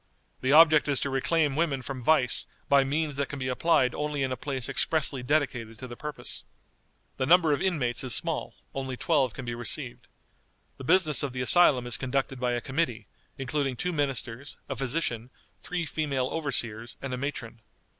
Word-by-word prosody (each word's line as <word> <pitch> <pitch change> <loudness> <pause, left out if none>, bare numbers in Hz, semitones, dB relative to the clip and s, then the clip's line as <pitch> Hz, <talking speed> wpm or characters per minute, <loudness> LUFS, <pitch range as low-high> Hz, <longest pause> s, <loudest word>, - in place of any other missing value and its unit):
The 130 - +1
object 155 0 +7
is 140 -2 +2
to 140 - -1
reclaim 145 +2 +1
women 145 -5 0
from 130 0 -6
vice 125 -2 +2 0.2
by 140 -1 +5
means 145 +1 -1
that 140 -1 -1
can 145 - -5
be 130 -1 -3
applied 130 -2 +2
only 150 -2 -2
in 130 - -1
a - - 0
place 130 -1 -4
expressly 140 -4 0
dedicated 125 -5 -1
to 130 - -8
the 120 - -8
purpose. 150 +3 -3 0.7
The 130 - -1
number 165 -2 +5
of 145 - -1
inmates 145 -12 0
is 130 -2 +3
small; 165 -3 -1 0.2
only 130 -2 -4
twelve 135 -7 +1
can 130 - -7
be 120 - -3
received. 120 +2 -2 0.7
The - - -9
business 165 -2 +4
of 140 -4 -2
the 125 - -3
asylum 135 -4 +4
is 120 +1 +1
conducted 135 0 -2
by 125 -1 0
a 120 - -1
committee, 130 -6 -2 0.3
including 135 0 -1
two 180 +8 -2
ministers, 135 -3 -3
a 135 - -4
physician, 125 -3 -2 0.3
three 175 -2 -3
female 140 -5 -1
overseers, 120 -7 -2
and 135 -2 -5
a - - -2
matron. 125 -4 -5
135 Hz, 185 wpm, -28 LUFS, 125-150 Hz, 0.7 s, object